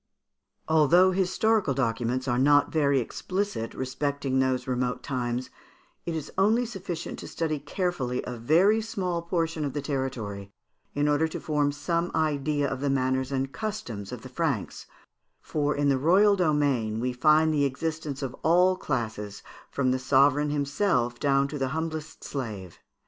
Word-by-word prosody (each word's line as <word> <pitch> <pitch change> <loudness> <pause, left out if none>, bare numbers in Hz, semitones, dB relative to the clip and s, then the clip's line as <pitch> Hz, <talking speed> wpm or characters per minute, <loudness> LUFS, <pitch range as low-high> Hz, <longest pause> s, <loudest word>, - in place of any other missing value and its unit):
] - - -58 0.2
Although 165 +4 +5
historical 190 -2 +1
documents 125 0 -1
are 120 -1 +1
not 145 +2 +4
very 140 -3 +2
explicit 185 - -3
respecting 135 0 -1
those 130 -1 +1
remote 125 -1 -2
times, 125 -2 -3 0.6
it 170 - -2
is 155 -2 -5
only 220 +5 +3
sufficient 185 -7 -6
to - - -8
study 155 -3 -2
carefully 145 -5 -2
a 125 - -5
very 175 - +3
small 185 -6 -2
portion 165 -2 -1
of 140 -3 -2
the 145 - -2
territory 125 -9 -4 0.5
in 145 +1 +1
order 150 +2 +2
to 160 - -6
form 145 -2 0
some 170 +4 -1
idea 150 -2 0
of 135 -1 -3
the 140 - 0
manners 130 0 0
and 135 0 -1
customs 125 - -5
of 125 -3 -7
the 130 - -9
Franks; 140 - -2 0.5
for 145 -1 -1
in 145 0 +1
the 135 -1 +2
royal 195 +8 +5
domain 145 - +1
we 125 +1 -1
find 155 +4 +4
the 145 -2 +2
existence 150 0 -3
of 130 -1 -4
all 180 +3 +4
classes, 110 - -4 0.3
from 130 -2 0
the 130 - 0
sovereign 140 +3 +3
himself 140 -4 0
down 140 -1 +2
to 145 +1 -6
the 135 - 0
humblest 160 -1 -5
slave. 105 - -6
145 Hz, 160 wpm, -27 LUFS, 130-165 Hz, 0.6 s, Although